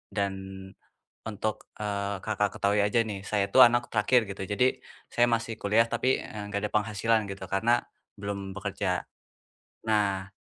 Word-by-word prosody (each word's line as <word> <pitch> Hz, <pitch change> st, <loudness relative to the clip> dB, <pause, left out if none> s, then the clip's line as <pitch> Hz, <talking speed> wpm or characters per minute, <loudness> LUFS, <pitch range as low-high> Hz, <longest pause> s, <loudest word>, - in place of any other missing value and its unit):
dan 100 Hz, -2 st, 0 dB, 0.9 s
untuk, 110 Hz, 0 st, -3 dB, 0.2 s
eee, 100 Hz, -1 st, -2 dB
Kakak 105 Hz, -1 st, -1 dB
ketahui 100 Hz, +1 st, +3 dB
aja 105 Hz, +3 st, +2 dB
nih, 105 Hz, -4 st, -3 dB
saya 100 Hz, -1 st, 0 dB
itu 100 Hz, -, -3 dB
anak 120 Hz, 0 st, +3 dB
terakhir 110 Hz, +1 st, +2 dB
gitu, 95 Hz, -1 st, -5 dB
jadi 125 Hz, +6 st, +1 dB, 0.3 s
saya 120 Hz, -, +3 dB
masih 115 Hz, -1 st, -1 dB
kuliah 110 Hz, +3 st, +2 dB
tapi, 130 Hz, +3 st, +1 dB
eee, 105 Hz, -, -7 dB
nggak 100 Hz, -, 0 dB
ada -, -, -22 dB
penghasilan 105 Hz, +1 st, +1 dB
gitu, 95 Hz, 0 st, -6 dB
karena 115 Hz, +5 st, +2 dB, 0.4 s
belum 100 Hz, -1 st, -4 dB
bekerja. -, -, -3 dB, 0.7 s
Nah, 100 Hz, -3 st, 0 dB
105 Hz, 150 wpm, -28 LUFS, 100-115 Hz, 0.9 s, ketahui